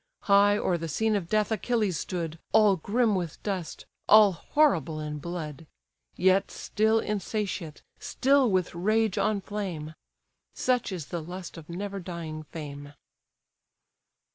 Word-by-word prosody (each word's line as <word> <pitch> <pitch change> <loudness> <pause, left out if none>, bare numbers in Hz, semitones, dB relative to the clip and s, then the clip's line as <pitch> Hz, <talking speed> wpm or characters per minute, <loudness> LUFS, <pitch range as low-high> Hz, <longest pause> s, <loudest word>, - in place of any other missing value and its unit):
High 205 0 +5
o'er 175 -4 0
the 165 - -4
scene 220 +8 +1
of 180 -4 -2
death 215 0 +1
Achilles 215 -5 0
stood, 165 -3 -4
All 210 -3 +6
grim 215 +6 +1
with 175 -5 -2
dust, 190 -5 -4 0.2
all 215 -2 +8
horrible 170 - +1
in 150 -1 -4
blood: 160 -2 -6 0.5
Yet 190 +2 +3
still 220 +1 +1
insatiate, 200 -6 -3 0.2
still 270 -1 +2
with 185 -2 0
rage 215 +3 +1
on 210 -2 +1
flame; 185 -7 -5 0.6
Such 250 -4 0
is 175 -6 -6
the 170 - -2
lust 175 +2 -8
of 165 -1 -11
never 200 +3 -4
dying 170 -4 -6
fame! 145 -2 -8
185 Hz, 135 wpm, -27 LUFS, 165-215 Hz, 0.6 s, all